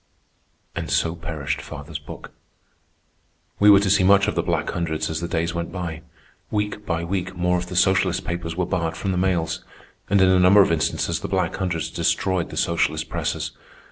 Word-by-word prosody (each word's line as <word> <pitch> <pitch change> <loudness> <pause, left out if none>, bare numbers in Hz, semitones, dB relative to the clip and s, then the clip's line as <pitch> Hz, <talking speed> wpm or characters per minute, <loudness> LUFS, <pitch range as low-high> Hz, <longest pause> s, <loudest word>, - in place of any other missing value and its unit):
And - - -4
so 80 - +1
perished 80 -4 -4
father's - - -7
book. - - -10 1.3
We 105 - +6
were 100 -1 +8
to 100 - 0
see 95 -1 +4
much 100 +1 +5
of - - 0
the - - +1
Black - - -1
Hundreds 80 -2 -2
as 80 - -2
the 85 - -2
days 85 0 -1
went 85 0 -4
by. 85 -3 -5 0.5
Week 105 0 -2
by 85 -1 -1
week 90 +1 -3
more 90 +1 +1
of 90 - -6
the 90 - -7
socialist 95 0 +2
papers 85 -1 -4
were 90 0 0
barred 85 -2 -2
from 100 - -2
the 90 - -1
mails, 85 -3 0 0.5
and 100 - +4
in 95 -1 +5
a 95 0 +4
number 95 +3 +7
of - - 0
instances 80 -2 0
the - - -5
Black - - 0
Hundreds 90 -4 -2
destroyed 95 -3 0
the - - -8
socialist 80 -2 0
presses. - - -2
90 Hz, 195 wpm, -23 LUFS, 85-95 Hz, 1.3 s, were